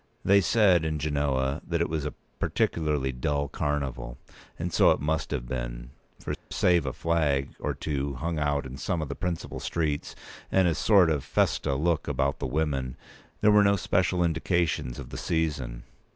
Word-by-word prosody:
They 100 +1 +6
said 95 -3 +4
in 80 -1 -1
Genoa 70 -1 0
that 85 -1 -2
it 85 - +1
was 75 -2 -2
a - - -7 0.2
particularly 75 -5 0
dull 70 +3 -1
carnival; 65 -5 -3 0.4
and 85 0 -3
so - - +6
it - - +3
must 75 +1 -1
have - - -3
been; - - -5 0.3
for, - - -4 0.2
save 85 -5 +2
a - - 0
flag 75 -5 0
or - - -2
two 70 -2 -2
hung 80 +5 -2
out 70 -1 0
in 65 0 -7
some 85 +4 -1
of 75 - -6
the 70 - -4
principal 90 -3 -4
streets, 75 -3 -2 0.4
and 95 -1 +4
a 85 - +2
sort 90 0 +4
of 75 -4 0
festa 70 - +1
look 80 +3 0
about 70 +1 0
the - - -2
women, 70 -3 -1 0.4
there 105 - +6
were 105 0 +6
no 100 0 +4
special 90 -1 +1
indications 80 -6 0
of - - -8
the - - -5
season. 70 -8 -2
75 Hz, 180 wpm, -27 LUFS, 70-85 Hz, 0.4 s, They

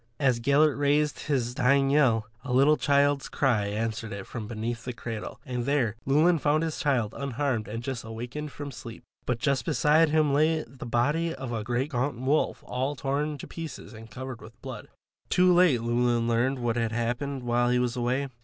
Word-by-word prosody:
As 130 -5 +2
Gellert 140 +4 +3
raised 145 +1 +2
his 125 -5 0
dying 135 +2 +3
yell, 125 -7 +3 0.2
a 140 - -5
little 135 +4 +5
child's 140 -1 +2
cry 115 -7 +1
answered 110 +1 -3
it 100 -1 -6
from 110 -4 -6
beneath 115 +1 -4
the 125 - -4
cradle, 115 -1 -6
and 125 -2 -3
there 130 -6 +1
Llewelyn 160 +5 +4
found 150 +2 +2
his 160 -2 -3
child 130 -10 +1
unharmed 140 -4 -2
and 115 +3 -5
just 130 -2 -4
awakened 120 +7 -6
from 145 0 -7
sleep. 115 -2 -10 0.2
But 125 - +1
just 135 0 0
beside 150 +2 +3
him 150 -2 +2
lay 155 +2 +2
the 125 0 -10
body 150 +8 +1
of 130 -2 -6
a 110 -2 -2
great 125 +6 -1
gaunt 125 -1 -1
wolf 135 +4 0
all 130 +3 -2
torn 145 +2 -2
to - - -8
pieces 165 -6 -8
and 115 0 -11
covered 130 +1 -7
with 115 +1 -14
blood. 130 -6 -7 0.4
Too 180 0 +4
late, 175 -9 +4
Llewelyn 120 0 +1
learned 120 +4 +1
what 120 -2 -1
had 115 -1 0
happened 125 +4 -2
while 120 0 +1
he 125 - +3
was 125 0 0
away. 125 +3 -1
130 Hz, 190 wpm, -27 LUFS, 120-145 Hz, 0.4 s, little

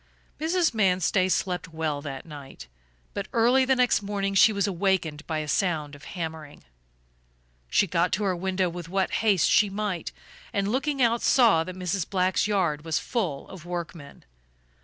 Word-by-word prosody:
Mrs. 330 0 +1
Manstey 185 -2 +2
slept 180 0 -1
well 160 -3 -3
that 135 -3 -7
night, 140 - -11 0.5
but - - -4
early 245 +3 +4
the 265 0 +3
next 250 -4 +3
morning 200 -1 -2
she 205 +3 +6
was 200 -2 0
awakened 180 -5 -1
by 160 - -2
a 155 -1 -3
sound 155 -4 0
of 145 - -12
hammering. 160 -3 -6 1.1
She - - +3
got 175 -1 0
to 210 - 0
her 190 -2 +1
window 185 +1 -1
with 170 -1 -7
what 190 +1 0
haste 205 -7 +3
she 210 -1 +4
might 195 -4 -3 0.4
and, 200 -1 0
looking 275 +3 0
out 235 0 +2
saw 225 -11 +4
that 185 - -7
Mrs. 180 -1 -2
Black's 185 +1 +1
yard 175 -8 0
was 160 -1 -1
full 185 - -3
of 185 -5 -11
workmen. 170 - -7
185 Hz, 165 wpm, -26 LUFS, 160-205 Hz, 1.1 s, she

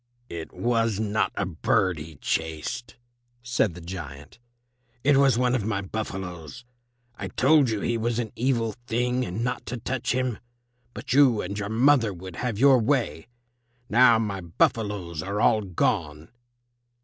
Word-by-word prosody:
"It 85 -1 -7
was 115 -3 0
not 110 0 0
a 100 - -1
bird 90 0 0
he 80 +1 -9
chased," 80 - -3 0.5
said 120 -7 0
the 90 - -9
giant; 75 - -8 0.6
"it 145 0 +4
was 135 -3 +4
one 125 0 +2
of 125 -5 0
my 105 -1 -1
buffaloes. 95 - -6 0.5
I 95 - -4
told 135 - +4
you 110 -2 -2
he 115 -1 -1
was 115 +1 -1
an 115 -3 -2
evil 115 -3 0
thing 125 +2 0
and 110 +1 -3
not 125 - -2
to 125 - -4
touch 125 +1 -2
him, 125 -2 -1 0.6
but - - -4
you 130 -6 +5
and 100 +3 -5
your 100 0 -3
mother 115 -2 +3
would 90 0 -9
have 120 -4 -2
your 135 +1 +6
way. 115 - 0 0.6
Now 120 0 +6
my 100 -4 -2
buffaloes 85 -1 -1
are 100 +4 -3
all 110 0 +4
gone." 80 -4 -1
110 Hz, 155 wpm, -25 LUFS, 90-125 Hz, 0.6 s, your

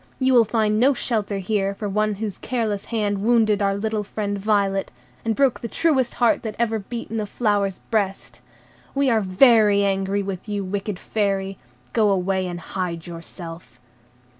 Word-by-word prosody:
You 260 0 +2
will 235 -2 +6
find 215 -1 +1
no 270 +3 +4
shelter 215 -5 -1
here 195 0 -1
for 210 - -4
one 210 +1 0
whose 205 -2 -5
careless 220 -5 -2
hand 210 -3 -1
wounded 215 -2 +3
our 195 0 +2
little 215 0 -1
friend 205 0 -3
Violet, 200 -1 +1 0.3
and 225 -1 0
broke 275 -3 +2
the 235 - -4
truest 265 -2 +1
heart 240 -2 +3
that 215 -2 -5
ever 225 -1 0
beat 230 +4 -7
in 225 - -1
a 210 - -3
flower's 205 -4 0
breast. 200 -3 -2 0.5
We 275 -2 +3
are 225 -1 +3
very 205 +1 +5
angry 195 +1 0
with 195 +1 -6
you, 205 -1 -2
wicked 195 +1 -3
Fairy; 195 -2 -2 0.3
go 215 -3 +3
away 190 -1 0
and 175 -1 -5
hide 170 -2 -4
yourself." 165 -3 -9
205 Hz, 170 wpm, -23 LUFS, 195-225 Hz, 0.5 s, will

